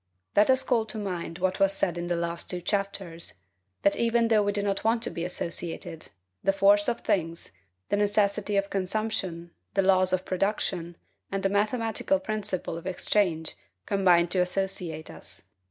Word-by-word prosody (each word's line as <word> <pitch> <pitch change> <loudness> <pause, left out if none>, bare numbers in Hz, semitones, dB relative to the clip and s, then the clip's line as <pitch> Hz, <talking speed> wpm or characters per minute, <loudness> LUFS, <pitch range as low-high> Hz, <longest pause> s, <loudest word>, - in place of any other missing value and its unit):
Let 210 +3 +5
us 260 0 +5
call 230 -4 +1
to 220 - -2
mind 180 -5 -4
what 185 +1 0
was 195 0 +4
said 180 -3 0
in 175 0 -3
the 175 - 0
last 170 0 -3
two 180 - -1
chapters, 185 - -2 0.5
That 200 - +4
even 235 0 +2
though 220 -2 +5
we 205 0 +1
do 205 0 -1
not 200 -1 -1
want 225 +1 +2
to - - -1
be 170 - -4
associated, 170 -2 -4 0.4
the - - +4
force 200 +1 +4
of 235 - 0
things, 165 -2 -1 0.4
the 205 - +2
necessity 205 0 +2
of 200 0 0
consumption, 185 -3 -2 0.2
the 195 - +4
laws 185 -1 +4
of 185 0 0
production, 185 -3 -1 0.3
and 195 0 -2
the 195 - +3
mathematical 210 -1 +1
principle 195 -4 -3
of 170 - -9
exchange 180 -3 0 0.3
combine 180 -4 +4
to 185 - 0
associate 180 -3 -1
us. - - -8
195 Hz, 170 wpm, -27 LUFS, 175-205 Hz, 0.5 s, Let